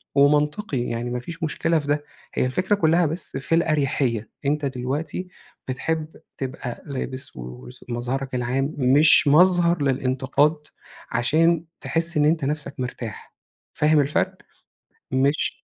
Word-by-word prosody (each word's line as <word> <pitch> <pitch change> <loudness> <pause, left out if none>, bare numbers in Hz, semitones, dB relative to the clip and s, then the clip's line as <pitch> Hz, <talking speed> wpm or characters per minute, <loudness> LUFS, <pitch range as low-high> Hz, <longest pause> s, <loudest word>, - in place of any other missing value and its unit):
ومنطقي. 150 - +2
يعني 120 0 -3
ما 125 0 -2
فيش 165 +7 -8
مشكلة 160 +1 +1
في 145 - -8
ده. 145 0 0 0.3
هي - - +1
الفكرة 185 +11 +1
كُلّها 170 -2 +3
بس 160 -2 -2
في 135 +4 0
الأريحيّة. 140 -8 0 0.2
أنت 145 +1 0
دلوقتي 135 +7 -3 0.4
بتحب 155 +4 -3 0.2
تبقى 130 -2 -5
لابس 130 -1 -5
وس 60 0 -10
مظهرك 125 +2 -3
العام 130 +4 -1
مش 145 +4 +5
مظهر 175 +2 +5
للانتقاد، 135 +3 +1 0.5
عشان 160 +8 +2
تحِس 165 0 +1
إن 150 - +4
أنت 155 -1 +2
نفسك 145 0 -2
مرتاح، 125 -4 -6 0.4
فاهم 150 0 +3
الفرق؟ 145 +1 +1 0.8
مش 135 +3 +1
140 Hz, 125 wpm, -23 LUFS, 130-160 Hz, 0.8 s, مش